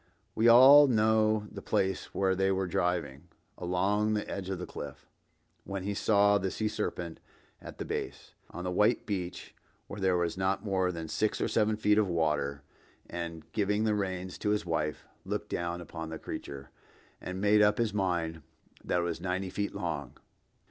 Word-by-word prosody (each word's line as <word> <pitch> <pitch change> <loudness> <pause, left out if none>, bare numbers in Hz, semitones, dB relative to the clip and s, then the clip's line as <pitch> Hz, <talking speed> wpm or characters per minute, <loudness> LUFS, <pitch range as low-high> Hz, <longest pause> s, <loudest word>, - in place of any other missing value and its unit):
We 115 +2 +3
all 135 +5 +9
know 110 -2 +3
the - - -8
place 95 0 0
where 95 -1 +1
they 95 +1 +2
were 95 0 0
driving 90 -4 -2 0.3
"along 100 +4 0
the 105 - -2
edge 95 -1 -5
of 95 -2 -3
a 90 - -4
cliff—when 90 +6 -10
he 100 +1 -2
saw 100 0 +3
the 95 0 -1
sea 110 +4 -2
serpent 85 -5 -4 0.4
at - - -10
the - - -5
base—on 90 - -6
the 90 - -2
white 105 +6 +2
beach 90 -4 -4 0.3
where 100 - -8
there 95 -2 +2
was 85 +1 -1
not 95 +2 0
more 95 -2 +1
than 85 -2 -6
six 105 +6 0
or - - +1
seven 110 -1 +1
feet 105 0 +3
of 105 - +2
water; 75 -5 0 0.4
and 85 -2 -6
giving 105 +2 +1
the 110 -1 +2
reins 95 -2 -3
to 105 - -1
his 105 -2 0
wife, 75 -3 -2 0.2
looked - - -4
down 85 0 -3
upon 80 -1 -7
the 80 - -5
creature, 70 -2 -7 0.5
and 90 +1 -5
made 105 +1 +4
up 105 0 +4
his 115 -3 0
mind 85 -5 -1 0.4
that 90 - 0
it - - -2
was 85 -1 -3
ninety 95 +1 -2
feet 100 +1 -3
long. 70 -7 -4
95 Hz, 175 wpm, -30 LUFS, 85-105 Hz, 0.5 s, all